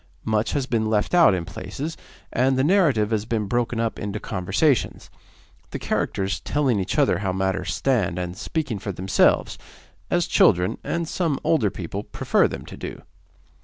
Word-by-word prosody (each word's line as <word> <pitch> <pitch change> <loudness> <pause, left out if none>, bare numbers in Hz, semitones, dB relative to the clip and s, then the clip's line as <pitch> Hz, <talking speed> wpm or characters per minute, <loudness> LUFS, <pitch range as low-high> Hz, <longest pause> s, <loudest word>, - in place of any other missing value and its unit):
Much 110 0 0
has 140 -3 0
been 115 -4 0
left 105 +5 0
out 170 - +6
in 85 -2 -3
places, 155 - -6 0.4
and 130 +1 +2
the 130 - +2
narrative 145 - +3
has 110 -2 +1
been 110 -2 -1
broken 120 +2 -1
up 115 -1 -1
into 105 0 -4
conversations, 105 - 0 0.6
the - - -4
characters 95 +1 -1
telling 135 -7 0
each 95 - -2
other - - +3
how 95 -2 -1
matters 95 0 -1
stand, 110 -11 0
and 90 0 -4
speaking 135 - -3
for 100 - -4
themselves, 95 +1 +2 0.5
as 175 -1 +2
children, 90 -1 +3
and 170 -1 -2
some 165 -5 -1
older 125 -11 +2
people, 95 +1 -5
prefer - - +1
them - - -7
to - - -9
do. - - -8
110 Hz, 165 wpm, -23 LUFS, 95-135 Hz, 0.6 s, out